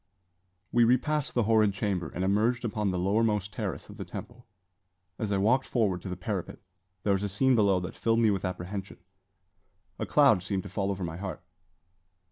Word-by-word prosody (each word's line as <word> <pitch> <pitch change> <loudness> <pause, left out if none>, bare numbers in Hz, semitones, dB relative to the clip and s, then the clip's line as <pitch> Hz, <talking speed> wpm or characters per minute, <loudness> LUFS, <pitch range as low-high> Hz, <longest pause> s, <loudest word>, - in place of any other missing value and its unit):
We 120 - +4
repassed 130 +5 +1
the 120 - +3
horrid 110 -2 +3
chamber, 95 -6 -1
and 90 - -4
emerged 110 +6 +1
upon 105 -2 -1
the 90 - -1
lowermost 105 +2 +1
terrace 100 -10 -4
of - - -12
the - - -4
temple. 120 -1 -9 0.7
As 105 -2 -2
I 100 - +2
walked 120 +7 +2
forward 100 -7 0
to 95 - -6
the 90 - -4
parapet, 95 0 -4 0.5
there 100 - +2
was 95 - 0
a 100 - -2
scene 130 +7 +3
below 100 -5 +4
that 90 - -5
filled 115 0 +1
me 115 -2 +4
with 95 -2 -2
apprehension. 95 +1 -5 1.0
A - - -2
cloud 140 -10 +5
seemed 95 0 -2
to - - -8
fall 95 +1 -1
over 95 -1 -3
my 85 -1 -4
heart. 90 -2 -6
100 Hz, 190 wpm, -28 LUFS, 95-115 Hz, 1.0 s, cloud